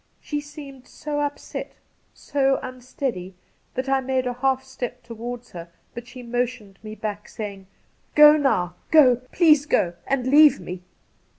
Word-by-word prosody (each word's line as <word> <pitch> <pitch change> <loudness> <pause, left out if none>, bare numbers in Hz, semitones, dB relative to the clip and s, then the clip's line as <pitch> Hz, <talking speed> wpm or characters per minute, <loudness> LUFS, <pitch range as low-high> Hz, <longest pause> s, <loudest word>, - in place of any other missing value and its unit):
She 295 -1 -4
seemed 285 -3 -12
so 295 -1 -5
upset, 290 0 -4 0.4
so 270 -1 0
unsteady, 250 -7 -5 0.4
that 255 +1 -3
I 270 0 +2
made 260 0 -1
a 250 - -1
half 265 +1 0
step 250 -2 -7
towards 240 +1 -7
her, 170 -1 -9 0.2
but 240 0 -8
she 250 0 -10
motioned 240 -4 -3
me 215 0 -8
back, 210 -1 -5
saying: 200 -3 -7 0.2
' - - -40
Go 300 0 +9
now 185 - +1
— - - -39
go! 265 -6 +6
Please 305 -4 +4
go, 175 -10 +1
and 270 -2 0
leave 295 +3 +6
me.' 180 0 -7
255 Hz, 160 wpm, -23 LUFS, 230-275 Hz, 0.4 s, Go